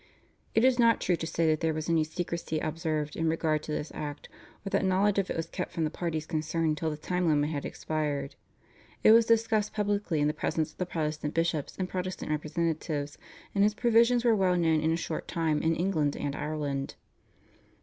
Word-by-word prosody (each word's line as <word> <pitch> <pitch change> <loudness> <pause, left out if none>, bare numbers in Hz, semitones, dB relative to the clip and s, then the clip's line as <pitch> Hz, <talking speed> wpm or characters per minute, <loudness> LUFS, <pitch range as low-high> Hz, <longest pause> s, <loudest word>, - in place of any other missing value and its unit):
It 225 - +5
is 260 -1 +4
not 230 -1 +5
true 180 - +1
to 165 - -4
say 165 0 0
that 155 -1 +3
there 160 -1 0
was 155 0 -3
any 165 -2 +3
secrecy 165 0 -3
observed 155 -1 -2
in 165 0 0
regard 160 -1 +1
to 155 - -7
this 150 0 -3
act, 145 -1 -6 0.4
or 195 - -4
that - - +2
knowledge 195 +2 +3
of 195 - -1
it - - -2
was 165 - -1
kept 180 +2 -4
from 165 - -2
the 155 - 0
parties 160 -3 -3
concerned 155 -1 -1
till 160 - 0
the 150 - -4
time 180 +3 -1
limit 150 -1 +2
had 145 -3 -3
expired. 145 -3 -3 0.7
It - - +8
was 230 0 +6
discussed 220 -2 +2
publicly 205 -5 0
in 145 - +2
the 150 - +1
presence 155 0 -1
of - - -29
the 180 - -1
Protestant 155 -3 -3
bishops 165 -3 -1
and 185 - -1
Protestant 185 -3 -4
representatives, 155 -1 -2 0.3
and 200 - +3
its 210 +1 +3
provisions 235 +1 +4
were 230 -2 +5
well 185 -3 +2
known 160 -2 +3
in 160 +1 +2
a 165 - +1
short 165 -2 -4
time 160 -3 0
in 165 0 +2
England 160 -5 0
and 145 -1 -3
Ireland. 145 -3 -3
165 Hz, 210 wpm, -29 LUFS, 155-185 Hz, 0.7 s, It